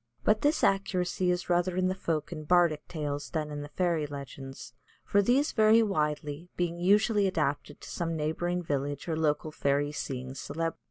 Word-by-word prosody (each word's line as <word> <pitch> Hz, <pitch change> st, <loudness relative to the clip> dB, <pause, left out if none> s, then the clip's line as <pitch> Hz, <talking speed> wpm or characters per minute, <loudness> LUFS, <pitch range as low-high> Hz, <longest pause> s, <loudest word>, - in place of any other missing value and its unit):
But 215 Hz, +1 st, +3 dB
this 295 Hz, +2 st, +2 dB
accuracy 185 Hz, -2 st, +1 dB
is 180 Hz, 0 st, 0 dB
rather 175 Hz, +1 st, +1 dB
in 185 Hz, 0 st, +2 dB
the 185 Hz, -, +1 dB
folk 165 Hz, -5 st, -2 dB
and 155 Hz, -3 st, -7 dB
bardic 170 Hz, -4 st, +3 dB
tales 145 Hz, -3 st, -4 dB
than 155 Hz, -3 st, -3 dB
in 145 Hz, 0 st, -4 dB
the 145 Hz, -, -7 dB
fairy 170 Hz, -3 st, 0 dB
legends, 135 Hz, -3 st, -8 dB, 0.3 s
for 200 Hz, -, +3 dB
these 260 Hz, +8 st, +2 dB
vary 220 Hz, 0 st, +5 dB
widely, 150 Hz, -3 st, -2 dB
being 175 Hz, -1 st, -1 dB
usually 205 Hz, +2 st, +3 dB
adapted 150 Hz, -6 st, -2 dB
to -, -, -10 dB
some 165 Hz, -2 st, -2 dB
neighbouring 175 Hz, +3 st, -1 dB
village 145 Hz, -1 st, -2 dB
or 165 Hz, -, 0 dB
local 155 Hz, 0 st, 0 dB
fairy 145 Hz, 0 st, 0 dB
seeing 130 Hz, -3 st, -5 dB
celebrity. 165 Hz, +4 st, -4 dB
165 Hz, 175 wpm, -29 LUFS, 145-185 Hz, 0.3 s, vary